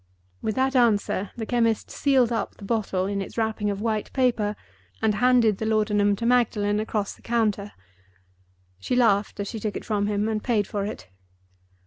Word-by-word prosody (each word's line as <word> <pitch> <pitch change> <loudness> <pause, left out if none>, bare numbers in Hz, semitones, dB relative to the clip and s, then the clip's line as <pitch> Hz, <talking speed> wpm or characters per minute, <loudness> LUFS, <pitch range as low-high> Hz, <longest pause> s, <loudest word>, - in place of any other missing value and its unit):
With 215 - -2
that 265 +1 +1
answer, 210 -5 +2
the 225 - -3
chemist 230 -1 0
sealed 260 -4 +2
up 230 - -2
the 200 - -10
bottle 195 -4 -1
in 200 0 -2
its 195 - -8
wrapping 220 -2 0
of 200 0 -3
white 220 -2 -2
paper 235 -6 +1 0.4
and 220 -1 +2
handed 235 -2 +3
the 220 - -2
laudanum 210 -2 +2
to 230 - -4
Magdalen 215 -4 +2
across 215 -2 -2
the - - -20
counter. 210 -3 -1 1.1
She 95 - -2
laughed 210 -5 +2
as 200 - -2
she 225 - -5
took 210 -1 -3
it - - -9
from 205 -2 0
him, 210 0 0
and 215 -1 -2
paid 220 -5 +1
for 200 0 -3
it. 90 - -7
215 Hz, 180 wpm, -25 LUFS, 205-235 Hz, 1.1 s, handed